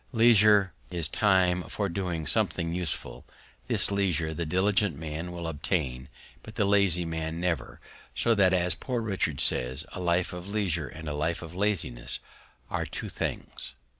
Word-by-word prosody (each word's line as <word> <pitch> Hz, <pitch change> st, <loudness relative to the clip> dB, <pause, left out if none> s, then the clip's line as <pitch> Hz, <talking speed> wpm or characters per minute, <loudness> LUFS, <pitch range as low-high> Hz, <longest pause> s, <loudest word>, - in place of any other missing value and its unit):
Leisure, 105 Hz, -4 st, +5 dB, 0.2 s
is 85 Hz, -4 st, +3 dB
Time 95 Hz, -2 st, +3 dB
for -, -, -1 dB
doing 85 Hz, -3 st, -3 dB
something 85 Hz, +3 st, +1 dB
useful; 90 Hz, -3 st, -2 dB, 0.4 s
this -, -, +2 dB
Leisure 90 Hz, -5 st, 0 dB
the 85 Hz, +1 st, -3 dB
diligent 95 Hz, -1 st, +1 dB
Man 80 Hz, +3 st, -5 dB
will 85 Hz, -1 st, -6 dB
obtain, 75 Hz, -5 st, -2 dB, 0.3 s
but 110 Hz, -, -12 dB
the 100 Hz, -, +2 dB
lazy 100 Hz, -4 st, +3 dB
Man 80 Hz, 0 st, -4 dB
never; 90 Hz, -2 st, -2 dB, 0.4 s
so 115 Hz, -, +2 dB
that, 100 Hz, -4 st, +4 dB
as 90 Hz, -1 st, +5 dB
Poor 125 Hz, -3 st, -3 dB
Richard 95 Hz, -, -1 dB
says, 65 Hz, +4 st, +1 dB
A -, -, -7 dB
Life 90 Hz, 0 st, 0 dB
of 90 Hz, +2 st, -7 dB
Leisure 90 Hz, -8 st, 0 dB
and 80 Hz, +2 st, -9 dB
a 75 Hz, -, -2 dB
Life 80 Hz, +4 st, -2 dB
of 80 Hz, +1 st, -9 dB
Laziness 80 Hz, -11 st, 0 dB, 0.5 s
are -, -, -3 dB
two -, -, -5 dB
things. 65 Hz, +3 st, -5 dB
90 Hz, 160 wpm, -28 LUFS, 80-100 Hz, 0.5 s, Leisure